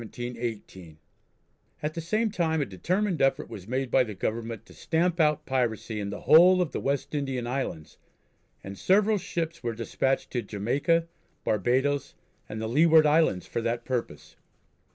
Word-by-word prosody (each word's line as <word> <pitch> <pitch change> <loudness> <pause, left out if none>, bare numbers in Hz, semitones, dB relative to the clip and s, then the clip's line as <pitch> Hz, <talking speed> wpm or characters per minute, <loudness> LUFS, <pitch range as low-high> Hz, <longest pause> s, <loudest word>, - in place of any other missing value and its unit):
At 150 +1 -2
the 165 - -4
same 215 +6 0
time 160 -5 0
a 145 - 0
determined 180 - -1
effort 135 +2 +1
was 95 -2 -9
made 130 +1 -2
by 130 - +5
the 110 -4 -7
Government 115 +2 -4
to - - -16
stamp 170 +2 0
out 150 -1 +2
piracy 115 -4 -1
in 100 -1 -3
the 100 - -6
whole 180 +4 +7
of 175 -6 0
the - - -3
West 140 +2 -2
Indian 135 -4 -2
Islands, 120 - -4 0.6
and 100 0 -8
several 205 +2 +3
ships 165 -2 -4
were 115 -2 -3
despatched 130 +4 -1
to 125 - -1
Jamaica, 140 +12 0 0.4
Barbadoes, 130 +7 0 0.3
and 110 - -5
the 110 - -3
Leeward 155 +5 +5
Islands 150 - +3
for 115 - -3
that 115 +1 -2
purpose. 120 - -4
135 Hz, 155 wpm, -27 LUFS, 115-165 Hz, 0.6 s, whole